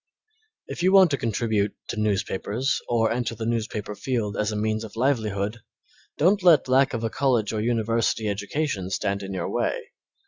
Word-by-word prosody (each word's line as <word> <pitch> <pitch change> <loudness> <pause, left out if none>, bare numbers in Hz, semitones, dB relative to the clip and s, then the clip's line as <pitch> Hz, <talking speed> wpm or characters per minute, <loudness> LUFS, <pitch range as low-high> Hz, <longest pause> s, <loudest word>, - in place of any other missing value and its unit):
If - - -6
you 185 +2 +4
want 190 -4 +7
to 140 - +1
contribute 110 -2 0
to 110 - -3
newspapers 105 +4 -1
or 115 -2 +2
enter 120 0 -2
the 110 0 -5
newspaper 110 -2 -2
field 105 -3 -2
as 105 0 0
a - - -3
means 110 +1 -1
of 110 -1 -9
livelihood, 110 -4 0 0.6
don't 195 +6 +3
let 170 -7 +5
lack 135 +1 +3
of 115 - -4
a 115 - 0
college 120 -6 +1
or 110 - -1
university 115 -1 0
education 100 0 -2
stand 100 +1 -1
in 95 0 -6
your 95 -3 -3
way. - - -2
115 Hz, 175 wpm, -25 LUFS, 105-130 Hz, 0.6 s, want